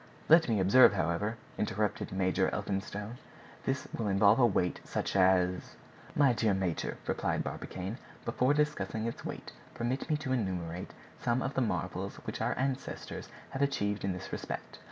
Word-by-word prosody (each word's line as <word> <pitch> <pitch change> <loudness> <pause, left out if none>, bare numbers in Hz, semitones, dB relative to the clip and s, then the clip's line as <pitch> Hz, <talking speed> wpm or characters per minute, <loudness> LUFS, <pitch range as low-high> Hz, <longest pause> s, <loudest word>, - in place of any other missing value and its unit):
"Let 160 -3 +7
me 110 -3 +2
observe, 100 +6 +7
however," 100 +4 0 0.2
interrupted 105 0 -1
Major 95 -1 +2
Elphinstone, 105 +4 -3 0.5
"this 135 0 -1
will 115 - -2
involve 100 +3 +5
a 125 - +7
weight 90 -4 0
such - - -3
as—" 90 -1 +3 0.4
"My 140 -4 +5
dear 110 -3 +2
major," 95 -4 -1
replied - - 0
Barbicane, 95 +6 -5 0.3
"before 130 +3 +2
discussing 110 -8 0
its 115 - -4
weight - - -6 0.2
permit 125 +6 -2
me 155 - +2
to 140 -3 -2
enumerate 90 -6 -3 0.3
some 120 +2 +1
of 135 - -2
the 135 - +1
marvels 115 - -2
which - - -4
our - - 0
ancestors 135 0 -3 0.2
have 135 - -3
achieved 105 -7 0
in 95 - +1
this 90 +1 -7
respect. - - -5
105 Hz, 155 wpm, -31 LUFS, 95-130 Hz, 0.5 s, Let